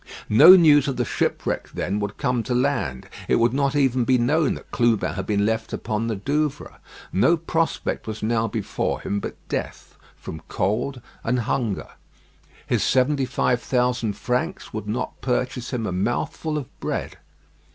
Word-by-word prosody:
No 155 Hz, -, +10 dB
news 150 Hz, -6 st, +6 dB
of 135 Hz, -, -2 dB
the 125 Hz, -, 0 dB
shipwreck -, -, -1 dB
then 100 Hz, +3 st, -1 dB
would 105 Hz, 0 st, -4 dB
come 125 Hz, -4 st, 0 dB
to 125 Hz, +2 st, -2 dB
land. 125 Hz, -, -1 dB, 0.2 s
It -, -, +3 dB
would 115 Hz, +1 st, +3 dB
not 140 Hz, +1 st, +1 dB
even 130 Hz, -3 st, +2 dB
be 125 Hz, +2 st, +3 dB
known 145 Hz, +5 st, +2 dB
that -, -, -12 dB
Clubin 120 Hz, -3 st, +1 dB
had 95 Hz, -, -5 dB
been 100 Hz, -1 st, +1 dB
left 110 Hz, 0 st, -1 dB
upon 110 Hz, +1 st, -2 dB
the 115 Hz, -, -1 dB
Douvres. 145 Hz, +8 st, -2 dB, 0.3 s
No 165 Hz, -, +4 dB
prospect 165 Hz, -4 st, -2 dB
was 110 Hz, -1 st, -5 dB
now 115 Hz, 0 st, +1 dB
before 110 Hz, -1 st, -2 dB
him 100 Hz, -, -2 dB
but -, -, -6 dB
death -, -, -5 dB, 0.2 s
from 80 Hz, -, -8 dB
cold 115 Hz, +7 st, -1 dB, 0.2 s
and 125 Hz, +1 st, +1 dB
hunger. 115 Hz, -3 st, -2 dB, 0.8 s
His -, -, 0 dB
seventy 135 Hz, +1 st, +2 dB
five 125 Hz, -1 st, 0 dB
thousand 125 Hz, -4 st, 0 dB
francs 160 Hz, -, -3 dB
would 110 Hz, -1 st, -5 dB
not 120 Hz, +4 st, -4 dB
purchase 125 Hz, -1 st, -2 dB
him 120 Hz, -3 st, -2 dB
a 100 Hz, -, -2 dB
mouthful 120 Hz, -, -2 dB
of 145 Hz, -, -3 dB
bread. -, -, -3 dB
125 Hz, 165 wpm, -23 LUFS, 110-140 Hz, 0.8 s, No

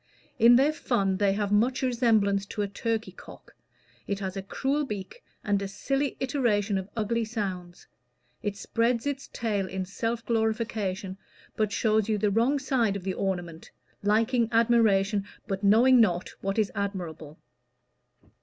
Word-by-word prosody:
In 235 Hz, +1 st, +7 dB
their 280 Hz, +5 st, +4 dB
fun, 195 Hz, -10 st, 0 dB
they 200 Hz, -1 st, +2 dB
have 205 Hz, 0 st, -2 dB
much 245 Hz, +6 st, +2 dB
resemblance 220 Hz, -6 st, +2 dB
to 210 Hz, -, -3 dB
a -, -, -1 dB
turkey 225 Hz, +2 st, -3 dB
cock. -, -, -14 dB, 0.5 s
It 200 Hz, -, -1 dB
has 190 Hz, -1 st, -4 dB
a 195 Hz, -, -3 dB
cruel 275 Hz, +9 st, -1 dB
beak, 210 Hz, -, -7 dB, 0.2 s
and 205 Hz, -3 st, +1 dB
a 200 Hz, -, -3 dB
silly 275 Hz, +7 st, -2 dB
iteration 225 Hz, -7 st, +1 dB
of 190 Hz, +1 st, -8 dB
ugly 230 Hz, +2 st, 0 dB
sounds; 190 Hz, -6 st, -5 dB, 0.6 s
it 205 Hz, -1 st, -3 dB
spreads 230 Hz, +3 st, 0 dB
its 280 Hz, -1 st, -3 dB
tail 205 Hz, -5 st, -1 dB
in 190 Hz, 0 st, -4 dB
self 230 Hz, +4 st, -3 dB
glorification, 220 Hz, -4 st, -1 dB, 0.4 s
but 215 Hz, -2 st, 0 dB
shows 220 Hz, 0 st, +1 dB
you 215 Hz, -, +2 dB
the 205 Hz, 0 st, +1 dB
wrong 235 Hz, +7 st, +2 dB
side 255 Hz, -7 st, 0 dB
of 200 Hz, -, -5 dB
the 190 Hz, 0 st, -2 dB
ornament 175 Hz, -4 st, -4 dB, 0.3 s
liking 225 Hz, +3 st, +2 dB
admiration, 220 Hz, -3 st, +3 dB, 0.2 s
but 195 Hz, -1 st, -4 dB
knowing 235 Hz, +5 st, +6 dB
not 180 Hz, -5 st, +1 dB
what 195 Hz, +2 st, -2 dB
is 215 Hz, -3 st, +1 dB
admirable." 170 Hz, -6 st, -5 dB
210 Hz, 155 wpm, -27 LUFS, 195-235 Hz, 0.6 s, In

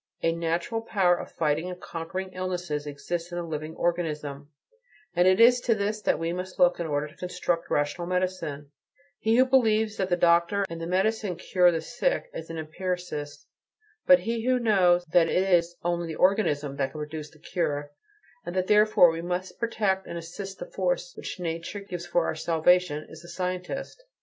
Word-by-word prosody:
A 165 Hz, -, +3 dB
natural 170 Hz, +7 st, -1 dB
power 195 Hz, -6 st, +2 dB
of -, -, -8 dB
fighting 155 Hz, +2 st, 0 dB
and 180 Hz, 0 st, -7 dB
conquering 185 Hz, +3 st, -5 dB
illness 180 Hz, -2 st, -4 dB
exists 150 Hz, +4 st, -4 dB
in 175 Hz, -, -4 dB
the 175 Hz, -, -2 dB
living 155 Hz, -1 st, -5 dB
organism, 150 Hz, -5 st, -2 dB, 0.7 s
and 175 Hz, +1 st, +4 dB
it 185 Hz, +2 st, +4 dB
is 245 Hz, +2 st, +7 dB
to 230 Hz, -2 st, +2 dB
this 210 Hz, +1 st, -2 dB
that -, -, +2 dB
we 165 Hz, +2 st, -2 dB
must 185 Hz, +1 st, -6 dB
look 175 Hz, 0 st, +4 dB
in 170 Hz, -, -2 dB
order 145 Hz, 0 st, -1 dB
to 150 Hz, -, -17 dB
construct 180 Hz, -2 st, -2 dB
rational 145 Hz, +4 st, -1 dB
medicine; 180 Hz, -6 st, -2 dB, 0.5 s
he 220 Hz, +1 st, +2 dB
who 255 Hz, +2 st, +6 dB
believes 220 Hz, -4 st, +2 dB
that 190 Hz, -1 st, -1 dB
the 175 Hz, -, +3 dB
doctor 170 Hz, +3 st, +3 dB
and 165 Hz, 0 st, -6 dB
the 165 Hz, -, -4 dB
medicine 195 Hz, +1 st, 0 dB
cure 180 Hz, +1 st, +3 dB
the 165 Hz, -1 st, -2 dB
sick -, -, -1 dB
is -, -, -7 dB
an 165 Hz, -, -5 dB
empiricist; 160 Hz, -2 st, -4 dB, 0.6 s
but 275 Hz, 0 st, +7 dB
he 230 Hz, 0 st, -2 dB
who 255 Hz, +1 st, +3 dB
knows 185 Hz, -7 st, +3 dB
that 165 Hz, 0 st, +3 dB
it 190 Hz, +1 st, +2 dB
is 170 Hz, 0 st, +3 dB
"only 175 Hz, 0 st, -1 dB
the 160 Hz, -, -5 dB
organism" 150 Hz, -8 st, +1 dB
that 135 Hz, -1 st, 0 dB
can 155 Hz, -, -7 dB
produce 150 Hz, 0 st, -6 dB
the 155 Hz, -, -20 dB
cure, 145 Hz, -3 st, -2 dB, 0.5 s
and 175 Hz, -, -6 dB
that 185 Hz, -1 st, +1 dB
therefore 210 Hz, -4 st, +6 dB
we 165 Hz, 0 st, -4 dB
must 180 Hz, +2 st, -4 dB
protect 205 Hz, -5 st, 0 dB
and 170 Hz, -, -5 dB
assist 190 Hz, +4 st, -7 dB
the -, -, -6 dB
force -, -, -2 dB
which -, -, -7 dB
nature 170 Hz, +3 st, -4 dB
gives 180 Hz, -3 st, -7 dB
for 175 Hz, -1 st, +1 dB
our -, -, -1 dB
salvation, 160 Hz, 0 st, +2 dB
is 160 Hz, +1 st, -12 dB
a -, -, -12 dB
scientist. 180 Hz, -, -4 dB
175 Hz, 190 wpm, -27 LUFS, 165-195 Hz, 0.7 s, is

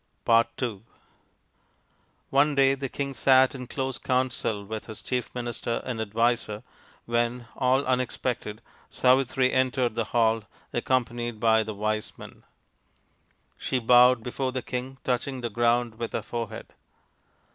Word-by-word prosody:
ii 110 Hz, -6 st, -3 dB, 1.5 s
One 145 Hz, +2 st, +3 dB
day 135 Hz, -1 st, +5 dB
the 135 Hz, -1 st, -4 dB
king 140 Hz, +1 st, -3 dB
sat 130 Hz, +2 st, +5 dB
in 125 Hz, -2 st, -7 dB
close 130 Hz, -1 st, -3 dB
counsel 125 Hz, -5 st, -1 dB
with 110 Hz, +1 st, -6 dB
his 110 Hz, -, -8 dB
chief 125 Hz, -1 st, -2 dB
minister 120 Hz, -1 st, -3 dB
and 115 Hz, -3 st, -3 dB
adviser, 110 Hz, 0 st, 0 dB, 0.4 s
when, 120 Hz, 0 st, -1 dB
all 130 Hz, +1 st, +2 dB
unexpected, 125 Hz, -3 st, -2 dB, 0.3 s
Savitri 130 Hz, 0 st, +3 dB
entered 130 Hz, -2 st, +1 dB
the 115 Hz, 0 st, -1 dB
hall, 115 Hz, -1 st, +1 dB, 0.3 s
accompanied 120 Hz, -2 st, -1 dB
by 110 Hz, 0 st, +4 dB
the 110 Hz, -1 st, -5 dB
wise 110 Hz, +1 st, -2 dB
men. -, -, -12 dB, 1.2 s
She 130 Hz, -, -1 dB
bowed 125 Hz, 0 st, +5 dB
before 130 Hz, +2 st, -2 dB
the 130 Hz, -1 st, -4 dB
king, 130 Hz, +2 st, -5 dB
touching 130 Hz, +1 st, -1 dB
the 120 Hz, -1 st, -3 dB
ground 120 Hz, 0 st, +1 dB
with 115 Hz, -, -4 dB
her -, -, -2 dB
forehead. 115 Hz, -1 st, -6 dB
120 Hz, 130 wpm, -26 LUFS, 115-130 Hz, 1.5 s, day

